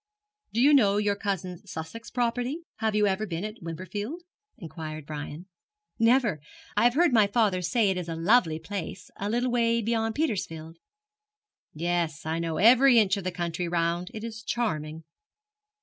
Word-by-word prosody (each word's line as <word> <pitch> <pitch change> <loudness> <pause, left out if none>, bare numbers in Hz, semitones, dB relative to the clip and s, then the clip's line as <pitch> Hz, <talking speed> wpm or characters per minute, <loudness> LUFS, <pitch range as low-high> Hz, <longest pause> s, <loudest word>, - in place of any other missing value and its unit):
'Do 230 - 0
you 285 +4 +6
know 205 -8 +5
your 205 -1 +1
cousin's 185 -4 -4
Sussex 160 +9 -7
property? 245 +6 -1
Have 220 -2 0
you 210 0 +4
ever 205 +2 0
been 170 0 -4
at 215 +1 -8
Wimperfield?' 205 - -5 0.3
inquired 155 - -7
Brian. 150 +3 -7 0.5
'Never. 230 - +3 0.3
I - - +3
have 245 +1 +4
heard 340 -3 +4
my 215 -3 +5
father 200 -4 +1
say 205 +3 +2
it 190 - -2
is 175 -2 -4
a 165 - -3
lovely 165 -1 +3
place, 190 +3 -6
a 200 - -3
little 240 +3 0
way 235 -1 +2
beyond 225 0 -1
Petersfield.' 165 - -3 1.0
'Yes, 170 -2 -1
I 160 +1 -1
know 165 -1 -2
every 245 - +6
inch 200 -4 +4
of 200 - -5
the 185 - -1
country 175 0 -3
round. 170 +1 -1
It 220 -2 -7
is 225 -1 -6
charming.' 160 -10 -2
200 Hz, 165 wpm, -27 LUFS, 165-230 Hz, 1.0 s, you